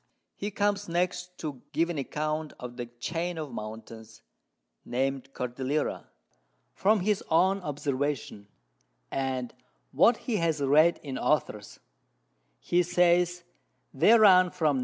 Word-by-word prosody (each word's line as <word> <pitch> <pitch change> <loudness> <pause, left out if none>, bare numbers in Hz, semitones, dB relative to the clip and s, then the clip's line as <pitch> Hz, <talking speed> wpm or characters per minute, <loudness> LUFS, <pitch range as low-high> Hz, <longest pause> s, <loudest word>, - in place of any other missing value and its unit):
_] - - -46 0.3
He 205 - -4
comes 205 -1 -1
next 180 +1 -2
to 145 -6 -6
give 170 +1 +1
an 160 - -3
Account 155 +2 -3
of 125 -1 -8
the 120 -1 -5
Chain 165 +9 -4
of 155 -4 -5
Mountains, 110 0 -9 0.6
named 135 +1 -2
Cordillera, 130 +4 -3 0.7
from 210 0 +2
his 205 +1 0
own 185 +4 +3
Observation, 140 - -3 0.6
and 130 -2 -2 0.4
what 235 0 +4
he 235 -5 0
has 165 -4 0
read 150 +5 +4
in 135 -3 -5
Authors: 105 -9 -1 0.8
He 175 +1 +1
says 175 0 +2 0.5
they 230 +2 +6
run 185 -4 +6
from 155 -5 0
N. - - 0
155 Hz, 130 wpm, -28 LUFS, 130-180 Hz, 0.8 s, they